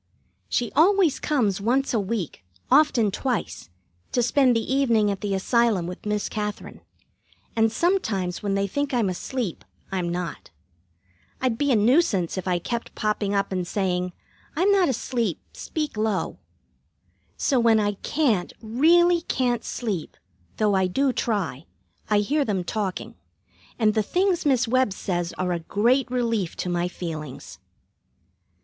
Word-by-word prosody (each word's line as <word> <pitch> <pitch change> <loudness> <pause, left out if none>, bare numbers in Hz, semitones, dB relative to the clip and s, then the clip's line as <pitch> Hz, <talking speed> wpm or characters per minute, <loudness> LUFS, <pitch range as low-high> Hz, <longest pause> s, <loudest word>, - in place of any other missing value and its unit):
She 240 -2 0
always 355 -2 +4
comes 215 -10 0
once 255 +6 +1
a 230 - +2
week, 200 - -3 0.3
often 245 -9 +4
twice, 240 - -3 0.4
to 245 - +2
spend 250 +1 +3
the 230 +3 -1
evening 230 -7 +3
at 200 - -5
the 200 -2 -1
Asylum 220 -2 +2
with 180 +4 -7
Miss 210 0 -1
Katherine, 210 -1 -5 0.7
and 225 -1 +3
sometimes 220 - 0
when 200 -1 -1
they 195 0 +1
think 285 +6 -2
I'm 225 -5 +2
asleep, 200 +2 -4 0.3
I'm 180 -2 -1
not. 175 0 -5 0.9
I'd 255 -3 0
be 285 +4 +1
a - - +4
nuisance 215 - +3
if 185 -1 -4
I 180 -1 +2
kept 235 +7 -4
popping 210 -1 -1
up 200 0 0
and 180 -2 -2
saying, 180 -2 -1 0.4
"I'm 370 +6 +3
not 380 -5 +4
asleep, 235 -5 -1
speak 305 -6 -4
low." 215 -2 -1 1.0
So 270 -4 +2
when 230 -2 +4
I 205 -1 +1
can't, 250 - 0
really 335 +10 +4
can't, 245 -7 -1
sleep, 200 -10 -4 0.4
though 210 -1 +2
I 190 -1 +2
do 265 +8 +1
try, 180 - -2 0.4
I 210 -1 +4
hear 290 +8 +1
them 200 -7 -1
talking, 195 +1 -3 0.6
and 215 -2 +3
the 215 - +2
things 355 - +1
Miss 255 -4 +3
Webb 255 -3 +2
says 175 -2 -2
are 180 0 -2
a 170 - -2
great 240 +10 +1
relief 230 -7 -1
to 180 - -3
my 175 0 0
feelings. 155 -6 -7
220 Hz, 150 wpm, -24 LUFS, 190-260 Hz, 1.0 s, always